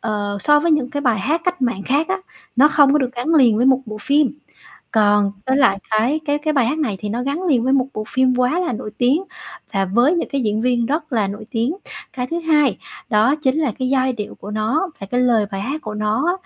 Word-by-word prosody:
ờ, 205 -2 -2
so 295 +4 +4
với 335 - +1
những 280 -4 0
cái 285 -1 -3
bài 240 -6 +1
hát 305 - 0
cách 360 -5 -1
mạng 235 -6 -1
khác 290 - 0
á, 380 +1 -1 0.4
nó 285 +4 +6
không 290 -2 +4
có 300 - +4
được 260 -3 -1
gắn 255 +7 -1
liền 245 -7 +5
với 245 - +2
một 265 -1 +4
bộ 215 -1 -6
phim. 285 +3 +2 0.6
Còn 205 -2 +3
với 260 +1 +2
lại 200 -8 +3
cái 235 +8 +1
cái 290 0 0
cái 305 +1 -1
bài 270 -5 +2
hát 295 +6 -1
này 220 -11 -1
thì 210 - -4
nó 235 +4 -2
gắn 280 +7 -3
liền 270 -10 +1
với 260 - +1
một 265 -2 +2
bộ 215 - -4
phim 260 -1 +2
quá 255 +7 +1
là 345 - -1
nổi 215 -1 -6
tiếng 270 +9 +2 0.5
và 195 -1 +1
với 240 - +2
những 340 - -2
cái 280 - 0
diễn 215 0 0
viên 240 -1 +1
rất 305 +3 -3
là 215 -5 +1
nổi 210 +2 -7
tiếng. 245 +7 -1 0.4
Cái 250 -1 -3
thứ 335 +5 -3
hai, 300 - +2 0.3
đó 220 +7 +3
chính 265 +1 +1
là 280 -7 0
cái 255 -1 -1
giai 260 -1 +1
điệu 210 -4 -6
của 205 - -10
nó 220 - -1
và 195 - -6
cái 250 0 +1
lời 235 -4 +2
bài 195 0 -4
hát 280 +8 -4
của 215 -1 -6
nó 215 +7 -1
á 350 - +3
255 Hz, 260 wpm, -19 LUFS, 215-295 Hz, 0.6 s, nó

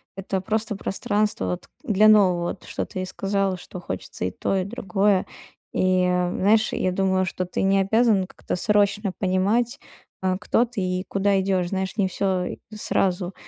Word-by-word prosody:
это 195 0 -3
просто 215 +2 -1
пространство 205 - -1
вот 90 - -6
для 215 -5 +4
нового, 185 -5 +4
вот - - -7
что - - -3
ты 185 - -5
и 185 - -2
сказала, 195 0 -1
что 180 - -9
хочется 95 - -5
и 90 - -1
то, 195 - -2
и 185 - -1
другое. 195 -2 +1 0.5
И, 185 0 +2
а, 180 0 +1
знаешь, 215 +3 +3
я 185 - 0
думаю, 190 0 +1
что 185 0 -3
ты 180 - -3
не 195 0 +3
обязан 210 0 +3
как-то - - -5
срочно 205 0 +2
понимать, 205 +7 +1 0.4
а, 185 -1 0
кто 225 +3 +1
ты 235 -4 -5
и 185 +1 -2
куда 195 0 +1
идешь. 190 -2 0
Знаешь, 190 0 -2
не 200 -3 +2
всё 185 -1 0
и - - -5 0.2
сразу. 190 -3 0
195 Hz, 180 wpm, -24 LUFS, 185-205 Hz, 0.5 s, для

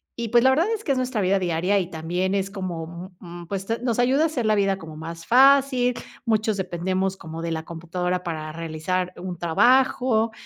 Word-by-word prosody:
Y, 235 -1 -4
pues, 240 +1 +4
la - - +7
verdad 320 +8 +2
es 440 -1 -4
que - - +1
es - - -2
nuestra 255 -3 -1
vida 195 +1 +2
diaria 180 +2 +1
y 180 -2 -3
también 175 +3 -2
es 195 0 -1
como, 175 -2 -6
mm, 175 -1 -10
pues, 195 +1 -4 0.2
nos 235 -3 0
ayuda 260 +5 +3
a - - +4
hacer 265 -7 -3
la 215 0 +3
vida 195 -1 +1
como 160 -4 -10
más 165 +1 -8
fácil, 265 -1 +5 0.3
muchos 220 -2 +1
dependemos 185 +1 -2
como 160 -1 -8
de 165 0 -3
la 160 -1 -3
computadora 180 +2 -3
para 155 -3 -4
realizar 165 +3 -3
un 180 -1 -6
trabajo, 230 +6 +3
190 Hz, 200 wpm, -24 LUFS, 170-235 Hz, 0.3 s, la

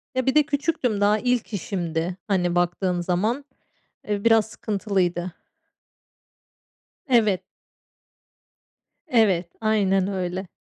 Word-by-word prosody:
Ya, 260 - 0
bir 265 - +1
de 300 - +6
küçüktüm 275 -7 -1
daha 210 +1 +3
ilk 245 -2 -1
işimdi, 175 -2 -3
hani, 180 -3 +1
baktığın 175 0 0
zaman. 215 +11 -1 0.6
Eee, 205 -1 -2
biraz 225 -2 +5
sıkıntılıydı. 185 -5 -1 1.8
Evet. 215 -6 +3 1.7
Evet, 195 - +2
aynen 195 -3 +2
öyle. 185 -1 -3
200 Hz, 95 wpm, -24 LUFS, 180-225 Hz, 1.8 s, de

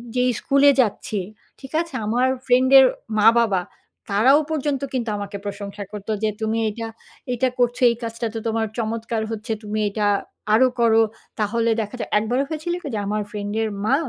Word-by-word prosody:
যেই 250 0 +3
স্কুলে 280 +1 +4
যাচ্ছি, 210 -2 -2 0.4
ঠিক 270 - -11
আছে? 335 - -8
আমার 245 +4 +2 0.2
ফ্রেন্ডের 260 +1 +6 0.3
মা-বাবা 225 -4 +4 0.5
তারাও 250 +9 +5
পর্যন্ত 290 -3 -1
কিন্তু 240 -3 -1
আমাকে 200 0 -5
প্রশংসা 200 0 -6
করত 205 -1 -8 0.2
যে, 215 - +3
"তুমি 220 +1 0
এইটা, 225 +2 -4 0.4
এইটা 250 +1 +1
করছো, 245 0 +1
এই 235 - 0
কাজটা 230 0 -3
তো 225 - -3
তোমার 225 0 0
চমৎকার 225 0 -2
হচ্ছে! 225 +1 -5
তুমি 210 +1 -3
এটা 205 0 0 0.5
আরো 255 +4 +6
করো।" 225 -1 +5 0.4
তাহলে 230 +2 +1
দেখা 210 +3 -6
যায় - - -4
একবার 240 +4 -1
হয়েছিল 315 +2 -3
কি? - - -7
যে 210 - -1
আমার 210 +1 -1
ফ্রেন্ডের 210 +1 -2 0.2
মা 260 - +4
225 Hz, 165 wpm, -22 LUFS, 215-250 Hz, 0.5 s, ফ্রেন্ডের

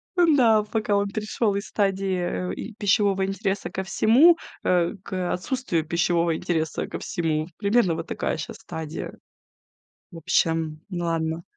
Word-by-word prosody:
Ну 340 -4 +5
да, 225 -5 +5
пока 210 -1 -1
он 200 0 +1
перешёл 210 0 -1
из 200 - -3
стадии, 195 -2 0 0.3
э, - - -3
э, 225 - -7
пищевого 200 -2 +2
интереса 195 0 -2
ко 190 - -4
всему, 255 - +5 0.3
э, 175 0 +2
к, 185 -3 -3
отсутствию 180 - -2
пищевого 170 0 +1
интереса 160 -1 -2
ко - - -6
всему. 160 -2 -1
Примерно 200 -4 +2
вот - - -5
такая - - -2
щас - - -6
стадия. 160 0 -6 1.0
В 170 - -9
общем, 160 -1 0
ладно. 165 -2 -2
190 Hz, 145 wpm, -24 LUFS, 165-210 Hz, 1.0 s, Ну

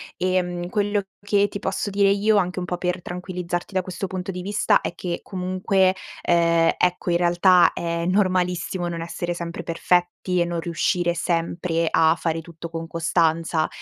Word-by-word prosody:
Ehm, 180 -1 -1
quello 205 +1 0 0.2
che 205 0 +2
ti 200 - -6
posso 200 +1 -2
dire 200 0 +3
io, 210 +1 +3
anche 185 -1 0
un 180 - -3
po' 180 0 -3
per 180 0 -2
tranquillizzarti 180 0 -5
da 185 - +2
questo 185 +2 -5
punto 185 0 -4
di 180 0 -6
vista, 205 +2 +2
è - - -5
che 175 -2 -4
comunque, 185 0 +1 0.3
ehm, 170 -1 +3
ecco, 180 0 +1
in 170 - +3
realtà, 175 +1 +5
è 170 0 -2
normalissimo 180 -1 0
non 170 -1 -4
essere 175 +1 -3
sempre 170 0 -6
perfetti 175 +1 0
e 170 - +3
non 170 -1 -3
riuscire 175 +1 0
sempre 170 0 -1
a 160 0 +4
fare 165 -1 -1
tutto 165 0 -9
con 165 0 -5
costanza, 165 -1 +1
180 Hz, 170 wpm, -23 LUFS, 170-185 Hz, 0.3 s, realtà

